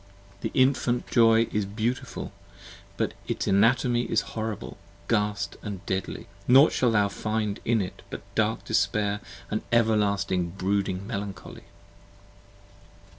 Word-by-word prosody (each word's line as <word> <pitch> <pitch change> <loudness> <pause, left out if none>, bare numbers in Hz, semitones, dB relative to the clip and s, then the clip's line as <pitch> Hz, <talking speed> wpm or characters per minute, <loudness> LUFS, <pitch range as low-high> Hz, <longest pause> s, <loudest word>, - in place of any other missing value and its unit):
The - - -3
Infant 130 -2 +2
Joy 115 -1 +5
is 105 - 0
beautiful, 110 +5 -3 0.7
but - - -1
its - - -2
anatomy 120 +4 +3
Horrible, 110 -1 -3 0.3
ghast 105 -2 0 0.2
& 95 0 -10
deadly: 95 0 -3 0.2
nought 135 +5 +7
shalt 120 -3 +2
thou 105 -2 +4
find 105 0 -2
in 115 -2 +2
it 90 - -6
But - - -7
dark - - 0
despair 105 -1 +1 0.3
& 105 - -4
everlasting 100 -6 +1
brooding 100 -1 -1
melancholy! 100 -3 -6
105 Hz, 115 wpm, -26 LUFS, 100-115 Hz, 0.7 s, nought